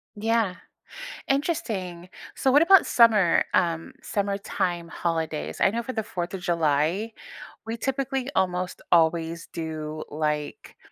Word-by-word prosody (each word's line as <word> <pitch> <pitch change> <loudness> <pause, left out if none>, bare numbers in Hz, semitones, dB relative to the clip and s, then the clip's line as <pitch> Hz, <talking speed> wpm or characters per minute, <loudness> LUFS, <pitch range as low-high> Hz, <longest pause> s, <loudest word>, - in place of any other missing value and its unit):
Yeah. 220 -3 +1 0.7
Interesting. 225 - -2 0.3
So, 265 - +2
what 290 +4 +6
about 385 +3 +6
summer, 215 -7 +5
um, 165 -2 +1
summertime 195 -4 -2
holidays? 160 - -3
I - - +5
know 230 +3 -2
for 255 +2 -5
the 220 - -2
Fourth 175 -1 -4
of 190 - -5
July, 170 +5 +1 0.5
we 225 - -3
typically 270 +1 -2
almost 180 -1 0
always 165 0 +2
do, 155 -1 -5
like, 150 -1 -3
180 Hz, 120 wpm, -25 LUFS, 165-225 Hz, 0.7 s, what